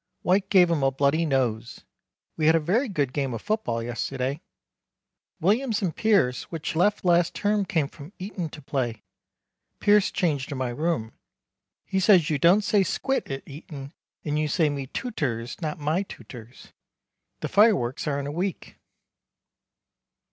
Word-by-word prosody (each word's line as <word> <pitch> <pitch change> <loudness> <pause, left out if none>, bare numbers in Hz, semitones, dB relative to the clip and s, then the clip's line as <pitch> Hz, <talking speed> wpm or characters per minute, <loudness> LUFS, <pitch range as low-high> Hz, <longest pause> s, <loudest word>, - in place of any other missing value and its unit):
White 190 +2 +2
gave 180 -3 +5
him 160 -4 +1
a 135 - +4
bloody 140 +4 +1
nose. 120 -5 -1 0.5
We 155 - +1
had 160 - +6
a - - +4
very 215 - +1
good 145 -9 -1
game 135 -4 -1
of 110 - -6
football 210 - -1
yesterday. 130 +4 -3 1.0
Williams 215 - +1
and 175 -4 -1
Pierce 190 -13 +2
which 165 -1 -5
left 205 +4 +2
last 175 -1 +3
term 205 -1 +1
came 160 -8 0
from 145 +3 -12
Eton 185 -3 -5
to 150 -1 -11
play. 125 -4 -2 0.8
Pierce 205 -1 +4
changed 150 -8 -1
in 140 - -3
my 130 -1 -1
room. 135 -4 -2 0.7
He 190 - -1
says 180 -4 +5
you 145 - 0
don't 180 +8 +5
say 205 0 +3
squit 270 +8 -1
at 135 0 -5
Eton 140 -1 -9 0.3
and 150 0 0
you 155 - +1
say 155 +1 +2
Metutors 140 - -4
not 155 +1 -3
My 155 +4 0
tutors. 120 - -11 0.7
The - - -2
fireworks 195 - +3
are 140 -1 0
in 140 - -4
a 145 - -4
week. 180 +4 -4
155 Hz, 155 wpm, -25 LUFS, 135-190 Hz, 1.0 s, had